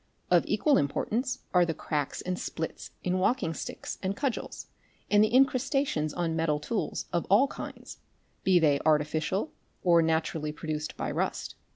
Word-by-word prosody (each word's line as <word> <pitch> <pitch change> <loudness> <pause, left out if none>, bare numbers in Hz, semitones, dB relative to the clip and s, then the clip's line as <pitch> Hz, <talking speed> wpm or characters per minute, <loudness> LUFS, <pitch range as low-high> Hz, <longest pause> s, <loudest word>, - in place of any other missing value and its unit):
Of - - +5
equal 295 -2 +3
importance 235 - -1
are 180 -1 +6
the 165 -2 -1
cracks 145 -2 -3
and 180 0 -2
splits 160 - -5
in 185 +1 0
walking 195 -3 +1
sticks - - -6
and 195 +1 -2
cudgels, 275 -4 -3 0.5
and 205 0 +6
the 215 - +3
incrustations 265 - +2
on 165 0 -1
metal 160 -2 +1
tools 215 +7 -2
of 170 - 0
all 205 +8 +6
kinds, - - -8 0.4
be 190 -2 +5
they 150 -4 +4
artificial 155 - +1 0.3
or 170 -2 +5
naturally 160 -1 0
produced 155 0 -4
by - - -2
rust. - - -2
170 Hz, 155 wpm, -29 LUFS, 155-210 Hz, 0.5 s, are